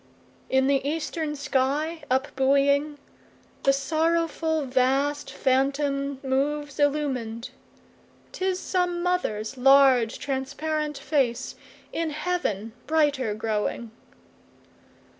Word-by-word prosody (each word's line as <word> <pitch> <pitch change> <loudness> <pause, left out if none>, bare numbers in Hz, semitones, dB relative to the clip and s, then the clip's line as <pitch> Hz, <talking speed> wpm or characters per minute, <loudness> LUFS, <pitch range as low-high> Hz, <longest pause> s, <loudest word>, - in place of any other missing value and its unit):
7In 265 0 +3
the 275 -1 +2
eastern 305 +1 -2
sky 290 +3 -1
up 265 +3 +1
buoying, 280 +2 +2 0.6
The 275 - +4
sorrowful 320 +2 0
vast 270 +3 +1
phantom 275 +1 0
moves 285 +2 -1
illumin'd;('Tis 290 +6 -3
some 360 -2 -1
mother's 270 -11 -1
large, 265 -3 +5
transparent 295 +2 -3
face, 265 -6 0 0.4
In 330 -1 -1
heaven 300 - -2
brighter 290 -8 +1
growing.) 215 +1 -2
280 Hz, 85 wpm, -25 LUFS, 265-305 Hz, 0.6 s, large